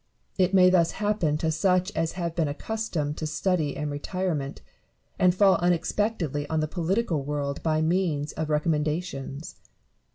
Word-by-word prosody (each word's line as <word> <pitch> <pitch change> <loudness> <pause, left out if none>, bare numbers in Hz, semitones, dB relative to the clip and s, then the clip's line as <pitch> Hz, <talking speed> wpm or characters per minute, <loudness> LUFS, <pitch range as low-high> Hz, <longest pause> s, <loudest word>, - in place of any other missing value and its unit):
It 185 0 +4
may 185 -2 +6
thus 170 -2 +3
happen 205 -8 0
to 160 +1 0
such 185 +4 +2
as 165 0 0
have 170 -2 -3
been 165 -3 +1
accustomed 155 -2 -3
to 155 - -3
study 155 -2 0
and 150 -1 -3
retirement, 150 -1 -3 0.6
and 180 -1 +4
fall 195 0 +5
unexpectedly 175 -3 0
on 160 - 0
the 155 - 0
political 175 0 0
world 140 0 -3
by 155 -1 +1
means 160 -4 0
of 155 -1 -4
recommendations. 150 -1 -2
165 Hz, 150 wpm, -26 LUFS, 150-185 Hz, 0.6 s, may